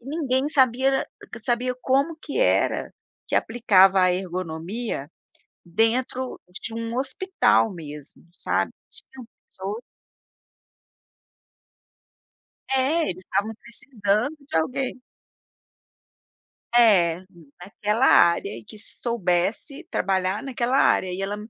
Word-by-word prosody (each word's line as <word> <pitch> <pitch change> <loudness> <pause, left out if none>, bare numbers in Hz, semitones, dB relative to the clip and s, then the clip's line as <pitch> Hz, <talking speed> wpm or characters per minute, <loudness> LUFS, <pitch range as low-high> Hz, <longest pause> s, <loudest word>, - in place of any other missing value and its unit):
Ninguém 275 0 -1
sabia 260 -3 +3
era 270 0 +1 0.3
q - - -8
sabia 250 +1 -1
como 280 +5 +1
que 295 - -4
era - - +1 0.4
que - - -2
aplicava 195 -5 +4
a 180 -1 +4
ergonomia 180 - -4 0.5
dentro 235 +7 -1 0.2
de 225 - -6
um 230 +1 -4
hospital 325 - +2
mesmo, 150 -4 -10
sabe. - - -1 0.2
Tinham 260 -3 -14 0.2
pessoas 200 +5 -6 2.9
É, 270 +5 +2
eles 185 +1 -6
estavam 205 +3 -1
precisando 220 +3 -2
de - - -3
alguém. 255 +9 -1 1.8
É, 185 -7 +4 0.4
naquela 210 +6 0
área 170 0 +5
e 115 - -10
que - - -13 0.3
soubesse 230 - -1
trabalhar 190 +2 0
naquela 255 -1 -1
área. 185 - +3
E 190 +2 -4
ela 205 +1 -2
225 Hz, 105 wpm, -24 LUFS, 185-260 Hz, 2.9 s, área